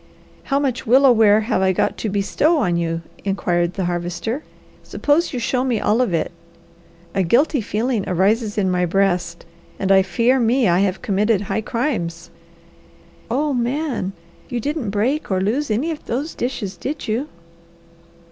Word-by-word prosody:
"How 275 - +1
much 270 -5 -1
willow 260 +3 +6
ware 215 -2 +5
have 215 -3 0
I 190 0 +3
got - - 0
to 220 - -2
'bestow' 205 - +1
on 180 - +1
you?" 165 -1 -2 0.2
inquired 175 -3 0
the 190 - -1
Harvester. 175 - -3 0.4
"Suppose 305 +4 0
you 255 - -4
show 250 +2 0
me 250 -4 0
all 215 +4 +2
of 245 - +1
it. 165 - -1 0.8
A 195 - +1
guilty 260 - +2
feeling 220 +1 -1
arises 205 +4 +1
in 190 -3 +1
my 180 0 +1
breast, 175 -2 0 0.3
and 195 0 0
I 190 0 +7
fear 230 +8 +2
me 240 0 +3
I 175 0 +3
have 190 -2 0
committed 205 +1 +1
high 200 +1 -2
crimes!" 205 - -3 1.0
"Oh 285 +5 0
Man! 245 -4 -1 0.4
You 245 -2 -2
didn't 285 -2 -2
break 235 +10 -1
or 190 -2 +1
lose 230 +10 0
any 250 +10 0
of 310 - -7
those 280 +7 -2
dishes, 210 -7 -4
did 285 - -5
you?" 230 +7 -1
215 Hz, 165 wpm, -20 LUFS, 190-260 Hz, 1.0 s, I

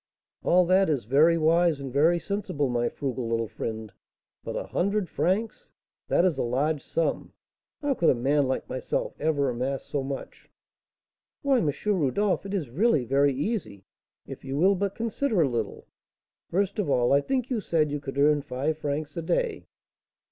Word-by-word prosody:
"All 180 0 +4
that 185 +1 +3
is 140 -8 0
very 155 +8 +4
wise 165 -1 +3
and 135 -2 -6
very 160 +5 +4
sensible, 170 -7 -2
my 120 -1 0
frugal 130 -4 -4
little 115 0 0
friend; 110 -1 -6 0.5
but - - -5
a - - -2
hundred 200 +1 -1
francs! 220 - -1 0.4
that 175 - +3
is 165 -7 +1
a - - +1
large 140 +5 0
sum; 165 - -2 0.5
how 285 -1 +2
could 170 -10 +2
a - - +4
man 140 +3 +2
like 130 - -2
myself 130 - -3
ever 145 -2 +1
amass 130 +3 -3
so 145 - -2
much?" 135 0 -7 0.9
"Why, 275 -3 +3
M. 155 - +1 0.2
Rodolph, 195 +1 +1
it 195 - -6
is 150 -11 -3
really 165 - +2
very 140 +3 +3
easy, 140 - -3 0.4
if - - -9
you 135 +1 -4
will 190 +6 +5
but 200 0 -2
consider 230 -2 0
a - - +2
little. 115 -5 -3 0.6
First 200 +3 0
of 195 - 0
all, 125 -1 +3
I 140 - +5
think 260 - -2
you 230 -4 0
said 155 -5 +1
you 145 - -2
could 135 -1 -7
earn 145 +1 +4
five 140 +4 -2
francs 150 0 -3
a - - -1
day?" 470 - -1
150 Hz, 175 wpm, -26 LUFS, 135-190 Hz, 0.9 s, will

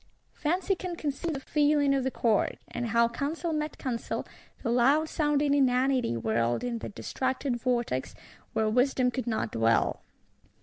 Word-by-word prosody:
Fancy 360 +5 0
can 365 -2 -4
conceive 310 +1 -3
the - - -3
feeling 290 0 +2
of 270 -1 +1
the 265 - +1
Court; 225 -5 +1
and 240 0 -4
how 235 +1 +3
counsel 310 +7 -3
met 305 0 -2
counsel, 240 -3 -3 0.4
the 235 - 0
loud 275 +6 +4
sounding 295 -2 +1
inanity 255 - +2
whirled 115 - 0
in 240 -2 -2
that 205 - -7
distracted 260 -1 -2
vortex, 240 - -1 0.4
where 220 - +1
wisdom 250 +2 +2
could 255 -2 -4
not 220 - -1
dwell. 115 0 +2
260 Hz, 150 wpm, -28 LUFS, 235-290 Hz, 0.4 s, loud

